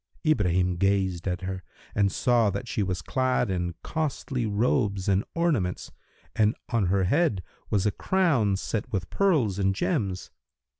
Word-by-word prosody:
Ibrahim 90 - +2
gazed 95 -2 +1
at 90 -1 -2
her 95 0 -4 0.3
and 100 -1 +2
saw 120 -4 +3
that 100 +5 -4
she 110 - -1
was 95 -1 -2
clad 130 -4 0
in 90 -2 -2
costly 140 -5 -2
robes 105 -2 0
and 100 +1 +3
ornaments, 145 - 0 0.4
and 110 0 +3
on 115 -6 +1
her 95 +1 +2
head 110 - +1 0.3
was 100 -1 +1
a 105 - +3
crown 135 - +2
set 105 +2 -3
with 95 -4 -3
pearls 140 - +2
and 95 0 +2
gems. 100 - -1
100 Hz, 150 wpm, -26 LUFS, 95-125 Hz, 0.4 s, saw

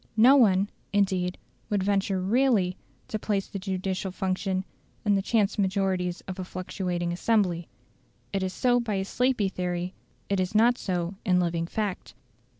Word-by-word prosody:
No 250 +5 +8
one, 200 -7 +5 0.2
indeed, 190 -3 +1 0.3
would 205 -3 +1
venture 195 -1 +1
REALLY 200 -2 +2 0.3
to 215 - -3
place 200 -2 -1
the 200 - -6
judicial 190 0 -2
function 190 0 -1 0.4
in 205 - +4
the 195 - +2
chance 210 0 +1
majorities 190 -2 0
of 190 0 -7
a - - -2
fluctuating 180 -1 -3
assembly: 180 -4 +1 0.7
it 195 - 0
is 190 0 -1
so 245 +4 +2
by 230 -4 -2
a 190 0 -1
sleepy 250 -1 +1
theory; 180 -1 -3 0.3
it 200 -1 0
is 185 +2 -1
not 240 +3 +5
so 175 -1 -2
in 180 -4 +3
living 170 -1 0
fact. 205 -1 -3
190 Hz, 155 wpm, -27 LUFS, 185-210 Hz, 0.7 s, No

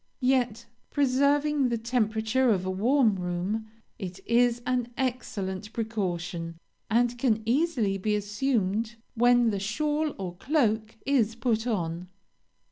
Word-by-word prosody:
Yet, 245 -3 +1 0.2
preserving 285 0 +2
the 235 - 0
temperature 230 +2 +1
of 190 -4 +1
a 185 - -1
warm 225 +2 +3
room, 180 +5 -2 0.3
it 185 -1 -6
is 240 0 +3
an 250 -2 0
excellent 215 -6 -3
precaution, 175 -7 -3 0.3
and 240 +1 +2
can 225 -4 +1
easily 240 -6 +1
be 210 +2 0
assumed 210 0 -1 0.2
when 240 -1 +4
the 200 - -2
shawl 295 +9 -1
or 180 -3 -5
cloak 220 - 0
is 235 -6 +2
put 230 0 0
on. 175 -5 -2
225 Hz, 125 wpm, -27 LUFS, 200-255 Hz, 0.3 s, when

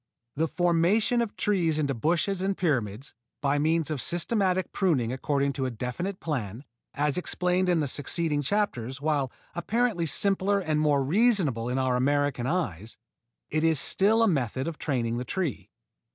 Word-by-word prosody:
The 160 +3 +1
formation 180 +8 +2
of 230 -3 -3
trees 175 -7 +1
into 145 -3 0
bushes 170 - 0
and 195 0 -1
pyramids, 130 - -1 0.3
by 145 0 +1
means 160 +1 +1
of 145 -4 -1
systematic 185 +1 0
pruning 135 - +1
according 140 +1 0
to 135 -2 -2
a - - -2
definite 125 - -4
plan, 125 - -4 0.3
as 150 +3 0
explained 180 +1 0
in 170 -3 +2
the 145 - -1
succeeding 150 +2 0
chapters, 140 - -1
while 145 -3 0 0.2
apparently 200 -1 0
simpler 200 +5 +1
and 155 -5 -1
more 145 -2 +2
reasonable 160 - +2
to 125 - -1
our 130 -1 +1
American 140 -1 +1
eyes, 115 - -3 0.5
it 155 +1 0
is 160 -3 +3
still 220 +9 +3
a - - +4
method 130 - -1
of 165 -2 -5
training 120 -5 -1
the - - -3
tree. 170 - -3
155 Hz, 160 wpm, -27 LUFS, 135-185 Hz, 0.5 s, a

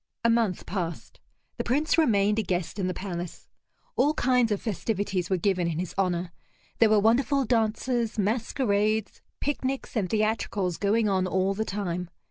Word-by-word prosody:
A 230 - +5
month 225 -6 +1
passed. 175 -4 -5 0.4
The - - -1
Prince 290 +5 +1
remained 210 -9 +3
a - - +3
guest 180 0 -2
in 185 - 0
the 185 - -1
palace. 175 -3 -6 0.5
All 300 +2 +3
kinds 250 -2 +2
of 205 - +1
festivities 205 -4 -2
were 190 - +2
given 180 -1 +1
in 165 -2 -2
his 180 0 -3
honor; 180 -2 0 0.5
there 225 - +6
were 215 -1 +5
wonderful 260 +6 +3
dances, 230 0 0
masquerades, 215 -1 0 0.2
picnics, 270 -2 -2
and 200 -5 0
theatricals 215 -4 0
going 215 +2 +2
on 190 -2 +1
all 190 +1 +1
the 220 +2 -2
time. 180 -4 -3
205 Hz, 160 wpm, -27 LUFS, 185-230 Hz, 0.5 s, there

